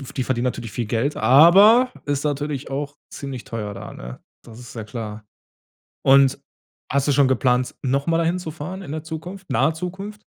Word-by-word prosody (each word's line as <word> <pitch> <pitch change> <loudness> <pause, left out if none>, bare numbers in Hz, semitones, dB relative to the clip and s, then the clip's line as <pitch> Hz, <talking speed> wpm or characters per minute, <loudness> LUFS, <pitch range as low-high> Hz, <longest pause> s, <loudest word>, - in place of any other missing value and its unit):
F 135 - -10
die 130 - -1
verdienen 125 -1 -1
natürlich 120 -3 -3
viel 120 -3 -3
Geld, 120 +7 -1
aber 190 - +7
ist 145 0 -1
natürlich 145 -1 -3
auch 145 +1 -4 0.2
ziemlich 135 -3 -7
teuer 105 -3 -5
da, 105 +2 -8
ne? - - -9 0.2
Das 115 -1 -13
ist 120 -1 -11
ja 110 - -6
klar. 110 -1 -7 0.8
Und, 135 0 +5 0.5
hast 140 +1 +1
du 145 - +3
schon 140 0 +4
geplant, 125 -1 +1
noch 140 +2 -1
mal 165 -1 +2
da 165 - +1
hinzufahren 175 +1 -4
in 165 -7 -8
der 155 -1 -5
Zukunft, 175 +4 -8
nahe 155 - +2
Zukunft? 195 +5 -7
140 Hz, 185 wpm, -22 LUFS, 125-165 Hz, 0.8 s, aber